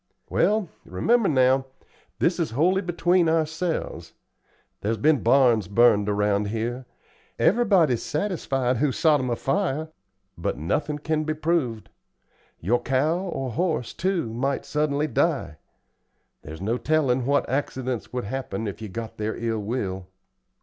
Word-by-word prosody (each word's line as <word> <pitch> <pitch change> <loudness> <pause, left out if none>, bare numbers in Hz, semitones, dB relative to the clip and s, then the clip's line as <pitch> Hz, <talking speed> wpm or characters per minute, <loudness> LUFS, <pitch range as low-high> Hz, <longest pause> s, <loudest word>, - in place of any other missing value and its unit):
"Well 210 -2 +2 0.2
remember, 225 - +1
now, 130 -1 +3 0.5
this 175 +1 +1
is 165 - 0
wholly 185 +5 +3
between 175 -1 +2
ourselves 160 +1 -2 0.7
there's 110 +2 -1
been 150 -2 +3
barns 120 -5 +4
burned 105 -1 +4
around 105 0 +1
here. 120 +4 -3 0.5
Everybody's 190 - +3
satisfied 135 - -1
who 140 +3 +1
sot 150 +2 +3
'em 130 -1 -2
afire, 155 - -1 0.5
but 85 - -3
nothin' 145 - -1
can 155 +1 -1
be 155 0 -2
proved. 150 -9 -1 0.7
Your 115 +8 +1
cow 150 +6 +1
or 150 -9 -4
horse, 155 -2 -1
too, 175 -11 -1
might 135 +3 -1
suddenly 150 -1 0
die. 140 - 0 0.8
There's 80 +3 -9
no 115 +5 -1
tellin' 135 -5 +1
what 140 0 +2
accidents 130 -2 -3
would 125 -1 -3
happen 115 -2 -4
if 105 +1 -5
you 110 - -6
got 115 +3 -6
their 110 +1 -2
ill 115 -1 -2
will." 100 -4 -3
135 Hz, 135 wpm, -25 LUFS, 115-160 Hz, 0.8 s, barns